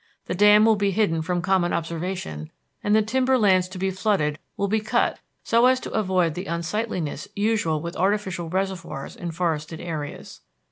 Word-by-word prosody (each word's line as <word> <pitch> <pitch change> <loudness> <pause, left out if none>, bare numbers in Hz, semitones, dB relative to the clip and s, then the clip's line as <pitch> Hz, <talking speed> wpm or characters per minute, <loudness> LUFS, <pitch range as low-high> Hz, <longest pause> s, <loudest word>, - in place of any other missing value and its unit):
The - - -3
dam 210 +3 +6
will 220 -1 +4
be 200 0 +1
hidden 190 -5 +1
from 175 +2 -2
common 190 -2 +2
observation, 165 - -4 0.3
and 205 +1 +3
the 220 - +4
timber 260 +4 +2
lands 190 -5 +4
to 185 +1 -9
be 190 +1 0
flooded 185 -6 0 0.2
will 200 - 0
be 220 +2 +1
cut 215 - 0 0.2
so 235 +2 +4
as 255 0 +3
to - - -6
avoid 185 -6 +1
the 180 +4 -6
unsightliness 170 0 -3
usual 205 -7 +1
with 170 +1 -5
artificial 190 -3 -1
reservoirs 185 -6 -3
in 175 - -5
forested 160 -2 -2
areas. 155 -4 -6
185 Hz, 175 wpm, -24 LUFS, 170-210 Hz, 0.3 s, dam